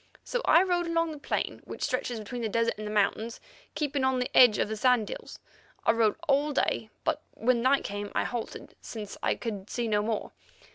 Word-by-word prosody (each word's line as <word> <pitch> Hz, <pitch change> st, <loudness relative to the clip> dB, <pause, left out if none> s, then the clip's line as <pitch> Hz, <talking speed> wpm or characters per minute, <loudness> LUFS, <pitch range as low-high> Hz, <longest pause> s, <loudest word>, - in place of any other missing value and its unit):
So -, -, -2 dB
I 335 Hz, +3 st, +6 dB
rode 350 Hz, -2 st, 0 dB
along 330 Hz, -1 st, +1 dB
the 300 Hz, -, -8 dB
plain -, -, -2 dB
which -, -, -6 dB
stretches 250 Hz, -1 st, -1 dB
between 225 Hz, +3 st, -6 dB
the 225 Hz, -, -1 dB
desert 230 Hz, +2 st, +1 dB
and 215 Hz, -, -4 dB
the -, -, -4 dB
mountains, 215 Hz, +2 st, 0 dB, 0.4 s
keeping 285 Hz, -2 st, -1 dB
on 260 Hz, 0 st, +2 dB
the 250 Hz, 0 st, -2 dB
edge 240 Hz, -4 st, +8 dB
of -, -, +1 dB
the 220 Hz, -, -3 dB
sand 240 Hz, -1 st, +3 dB
hills. -, -, -8 dB, 0.5 s
I -, -, +6 dB
rode 225 Hz, -2 st, +2 dB
all 290 Hz, +1 st, +2 dB
day, 225 Hz, -4 st, 0 dB
but 315 Hz, -2 st, 0 dB
when 235 Hz, +1 st, +2 dB
night 270 Hz, +3 st, +3 dB
came 205 Hz, 0 st, -4 dB
I -, -, +2 dB
halted, 240 Hz, -2 st, -5 dB
since 210 Hz, -3 st, -7 dB
I -, -, +1 dB
could 210 Hz, -4 st, -5 dB
see 240 Hz, -1 st, -2 dB
no 210 Hz, -1 st, +2 dB
more. 215 Hz, 0 st, -2 dB
235 Hz, 210 wpm, -28 LUFS, 215-280 Hz, 0.5 s, edge